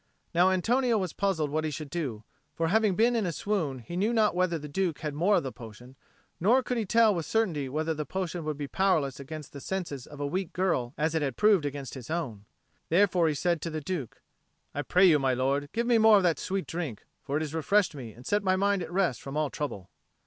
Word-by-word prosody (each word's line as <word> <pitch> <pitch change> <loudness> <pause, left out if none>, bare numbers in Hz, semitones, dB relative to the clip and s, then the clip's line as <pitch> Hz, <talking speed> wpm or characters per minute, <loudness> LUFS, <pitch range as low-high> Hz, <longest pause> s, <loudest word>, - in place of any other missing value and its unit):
Now 175 +2 +5
Antonio 235 +6 +2
was 185 -5 -2
puzzled 170 -7 0
what 155 +1 0
he 155 - -1
should 150 -1 -6
do; 135 -11 -3 0.3
for 165 0 0
having 215 -1 +3
been 235 +4 +3
in 220 -5 +1
a - - -1
swoon, 165 -6 -2
he 130 +8 -8
knew 210 +6 +1
not 220 -2 +3
whether 180 -1 +1
the 150 -1 -7
Duke 170 +1 -2
had 150 -2 -3
more 180 +8 +3
of - - +2
the 130 - -4
potion; 120 +3 -12 0.4
nor 240 +9 +4
could 250 - -2
he 215 - -2
tell 225 +1 +5
with 165 -5 -3
certainty 170 -12 0
whether 155 +4 -1
the 155 -1 -3
potion 175 +2 -4
would 155 -1 -3
be 145 -1 -4
powerless 155 -7 +1
against 150 +1 -8
the 140 - -8
senses 165 -9 -4
of 145 - -11
a 145 - -1
weak 180 +4 -3
girl 155 -9 0
as 155 +1 0
it 160 - +1
had 135 -4 -2
proved 200 -8 +4
against 140 -2 -6
his 125 -4 -9
own. 120 -12 -3 0.4
Therefore 180 -1 +3
he 155 - 0
said 170 +2 0
to 165 - -3
the 155 -1 -3
Duke, 155 - -5 0.5
"I 145 - -2
pray 180 +6 +4
you, 160 -5 +6
my 130 -2 +1
lord, 140 +3 0
give 235 +1 -1
me 235 -1 +4
more 220 -1 +7
of 195 - +2
that 170 -3 +2
sweet 195 -1 -2
drink. 160 - -5 0.2
For 140 +1 -2
it - - -1
has 155 -1 -4
refreshed 170 +3 +2
me 125 -6 -8
and 120 +4 -15
set 205 +6 +1
my 185 -1 +2
mind 200 0 +1
at 165 -1 -6
rest 175 - 0
from 135 +2 -6
all 155 -2 0
trouble." 100 -11 -5
165 Hz, 245 wpm, -28 LUFS, 145-190 Hz, 0.5 s, more